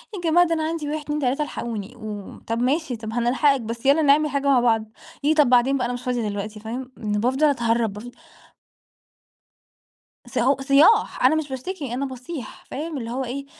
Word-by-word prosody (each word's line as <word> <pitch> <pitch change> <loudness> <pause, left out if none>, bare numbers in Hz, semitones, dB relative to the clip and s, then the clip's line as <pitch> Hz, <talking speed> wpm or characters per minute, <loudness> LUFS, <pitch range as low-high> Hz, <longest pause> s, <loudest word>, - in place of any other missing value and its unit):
يا - - -5
جماعة 350 +1 +5
ده 330 - 0
أنا 315 -1 -1
عندي 315 -2 -3
1 310 0 -2
2 295 0 -3
3 275 +2 0
الحقوني، 235 -4 -6
وطَب 215 +1 -6
ماشي، 275 0 0
طَب 220 0 -7
هنلحقك 255 +3 +2
بس 230 +3 -6
يلّا 285 +4 +5
نعمل 295 +1 +4
حاجة 280 0 -1
مع 265 -3 +5
بعض، 225 -2 +2 0.4
ييه 310 +2 +3
طَب 295 -5 +4
بعدين 255 +2 +4
بقى 250 - -1
أنا 245 - -2
مش 245 0 -6
فاضية 245 -4 -1
دلوقتي، 210 +1 -5
فاهم؟ 250 +4 -6
إن 210 -2 -4
بافضل 260 +8 +2
أتهرّب، 230 -5 +1
بافضل 235 +4 -9 2.2
ص 240 - -4
هو 260 +4 +3
صياح 300 +12 +4
أنا - - +6
مش 315 -2 -1
باشتكي 265 -1 -5
أنا 275 +2 -2
باصيح 260 0 -8
فاهم، 305 +1 -4
اللي 230 -1 -5
هو 260 +2 -2
إيه، 275 +3 -5
260 Hz, 195 wpm, -23 LUFS, 235-295 Hz, 2.2 s, أنا